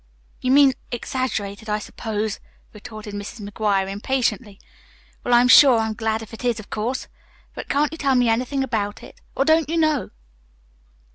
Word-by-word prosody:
"You 255 - -1
mean 275 0 +6 0.2
exaggerated, 230 -4 -3
I 210 - +1
suppose," 215 0 -4 0.3
retorted 215 -1 -9
Mrs. 205 +1 -7
McGuire 205 -2 0
impatiently. 210 0 -2 0.6
"Well, - - -2
I'm 240 +1 +5
sure 255 -1 +8
I'm 220 -1 -1
glad 220 0 -2
if 225 - -14
it 225 - -9
is, 240 -2 0
of 215 - -12
course. 235 +5 -3 0.5
But - - -8
can't 290 +1 +1
you 320 - -8
tell 275 -2 +2
me 245 -1 +3
anything 250 +4 0
about 210 -5 -3
it? - - -14
Or, 275 - +1
don't 315 -1 +3
you 335 - -1
know?" 310 -3 +1
230 Hz, 165 wpm, -22 LUFS, 210-265 Hz, 0.6 s, sure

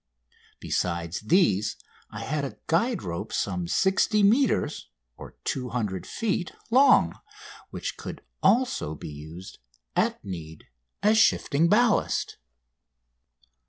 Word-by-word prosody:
Besides 85 -1 -2
these 110 - +2 0.3
I - - -7
had 150 0 -2
a 125 -7 -5
guide 205 +6 +1
rope 85 -1 -5
some 90 -3 -2
60 195 - +2
metres 235 - +2 0.5
(200 115 -7 -3
feet) 200 -6 -2 0.2
long, 270 +4 +5 0.5
which - - -5
could - - -8 0.2
also 240 - +2
be - - -8
used, 80 +5 -10 0.4
at - - 0
need, 80 -5 -8 0.4
as 215 +1 +5
shifting 165 -6 +3
ballast. 230 +2 +2
135 Hz, 100 wpm, -26 LUFS, -, 0.5 s, long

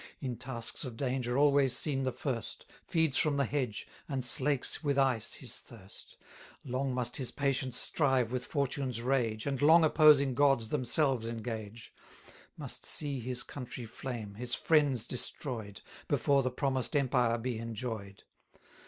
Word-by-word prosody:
In 130 -4 -4
tasks 120 -1 -3
of 125 -5 -7
danger 125 -1 -1
always 140 -3 +4
seen 140 -3 0
the 130 - 0
first, 125 -3 -4 0.2
Feeds 160 -5 +2
from 150 -2 +1
the 140 - +2
hedge, 125 -5 -3 0.2
and 135 -3 -2
slakes 140 +4 +1
with 140 -2 0
ice 130 -5 +1
his 125 -4 -3
thirst, 105 -5 -14 0.5
1110 130 - -9
Long 130 +1 -1
must 120 -1 +1
his 130 -3 -2
patience 135 -3 -1
strive 130 -6 +1
with 125 -1 -2
fortune's 135 -4 -1
rage, 120 -4 0
And 140 -1 -2
long 160 +3 +7
opposing 150 -4 +5
gods 135 -4 +3
themselves 130 -2 +1
engage; 115 -1 -6 0.6
Must - - -4
see 140 -3 +1
his 125 +1 -2
country 125 -2 -7
flame, 115 -2 -6
his 120 +3 -3
friends 145 -7 +2
destroy'd, 115 -5 -4 0.3
Before 140 -1 +2
the 130 - 0
promised 130 +2 -1
empire 125 -4 +2
be 120 -1 -3
enjoy'd. 110 -3 -6
130 Hz, 150 wpm, -31 LUFS, 115-140 Hz, 0.6 s, long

